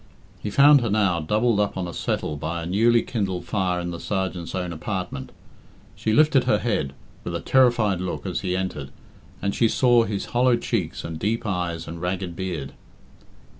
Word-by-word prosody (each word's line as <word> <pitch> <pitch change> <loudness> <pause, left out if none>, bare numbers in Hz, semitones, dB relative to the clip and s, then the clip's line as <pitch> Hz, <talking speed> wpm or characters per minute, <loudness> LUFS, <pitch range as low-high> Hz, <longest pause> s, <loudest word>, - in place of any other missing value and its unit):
He 105 - -3
found 140 +4 +6
her 115 - -1
now 100 -4 +2
doubled 105 +7 +1
up 105 -2 0
on 90 -2 -2
a 85 - -7
settle 75 - -2
by 80 +3 -4
a - - -5
newly 115 +6 +3
kindled 95 -6 -3
fire 95 -3 0
in 85 0 -3
the 85 - -6
sergeant's 95 -4 -3
own 90 -2 -3
apartment. 90 -5 -4 0.6
She 110 - -1
lifted 145 0 +4
her 130 - +3
head, 100 - -1 0.3
with - - -4
a - - -1
terrified 120 -8 +3
look, 90 - -4
as - - -2
he 90 0 -1
entered, 85 -7 -4 0.5
and 100 0 0
she 115 - +3
saw 120 0 +4
his 100 -2 -3
hollow 125 0 +4
cheeks 100 -9 -2
and 80 -1 -6
deep 110 +5 -1
eyes 90 -4 -2
and 85 +1 -7
ragged 90 -1 -3
beard. 85 -7 -4
95 Hz, 185 wpm, -24 LUFS, 85-115 Hz, 0.6 s, found